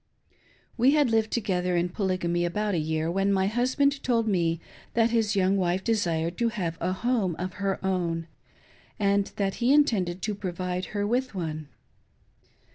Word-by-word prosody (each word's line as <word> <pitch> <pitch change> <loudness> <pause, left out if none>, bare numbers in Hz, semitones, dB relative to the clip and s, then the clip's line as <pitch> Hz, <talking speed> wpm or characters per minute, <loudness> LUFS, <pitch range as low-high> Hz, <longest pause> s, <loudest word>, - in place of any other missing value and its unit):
We 255 +4 +5
had 290 -6 +3
lived 220 -1 +2
together 180 -5 0
in 175 +1 +1
Polygamy 180 -3 -1
about 205 +4 -1
a 170 - +1
year, 160 +1 -1
when 195 +2 +1
my 190 -1 +2
husband 260 +6 +1
told 230 -3 +1
me 170 -5 +1 0.4
that 230 0 +3
his 220 -2 +1
young 195 0 +3
wife 185 0 0
desired 170 -7 0
to 235 -1 +2
have 180 -8 -3
a 180 +2 0
home 200 -3 0
of 185 +2 -4
her 195 -1 0
own, 170 -3 -1 0.7
and 200 -1 +2
that 195 -1 -1
he 240 +3 +4
intended 200 -12 +2
to 215 - -1
provide 180 -2 -3
her 205 - +1
with 245 +1 -1
one. 155 -4 -4
195 Hz, 165 wpm, -27 LUFS, 175-225 Hz, 0.7 s, We